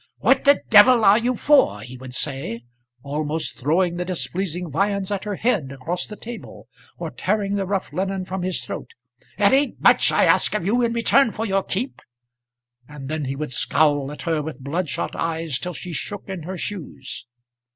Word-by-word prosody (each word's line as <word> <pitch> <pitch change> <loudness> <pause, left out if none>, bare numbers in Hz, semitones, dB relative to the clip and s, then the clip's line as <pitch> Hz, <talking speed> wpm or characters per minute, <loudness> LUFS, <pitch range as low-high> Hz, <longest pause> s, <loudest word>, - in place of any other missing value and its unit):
"What - - +3
the 285 0 +5
d 215 - +6
are 215 -2 +7
you 245 +2 0
for?" 255 - +3
he 125 +3 -9
would 130 0 -7
say, 130 -6 -4 0.4
almost 150 +2 -2
throwing 170 +6 +1
the 180 - -1
displeasing 180 -1 -3
viands 200 +4 0
at 200 0 -2
her 205 -1 -2
head 190 - 0
across 160 +7 -3
the 210 - -8
table, 235 +2 -9 0.3
or - - -5
tearing 205 -2 -1
the 195 -2 -1
rough 195 -1 -2
linen 190 0 -2
from 190 0 -4
off - - -2
his 185 -1 -1
throat. - - -7 0.4
"It 200 +2 +4
ain't 280 +2 +2
much - - +5
I - - +4
ask - - +3
of 185 - -1
you 235 +5 +2
in 235 -1 +1
return 235 +2 +3
for 225 - -3
your 195 -2 +1
keep;" 225 +8 -4 0.9
and 140 -2 -8
then 155 -1 -2
he 135 +1 -3
would 150 -1 -4
scowl 145 +1 +2
at 150 - -8
her 165 -2 0
with 150 -1 -6
bloodshot 160 +4 -3
eyes 165 -4 -2
till 180 0 -4
she 180 - -7
shook 205 +6 -6
in 190 -3 -5
her 190 - -4
shoes. 175 -8 -6
180 Hz, 195 wpm, -22 LUFS, 150-205 Hz, 0.9 s, are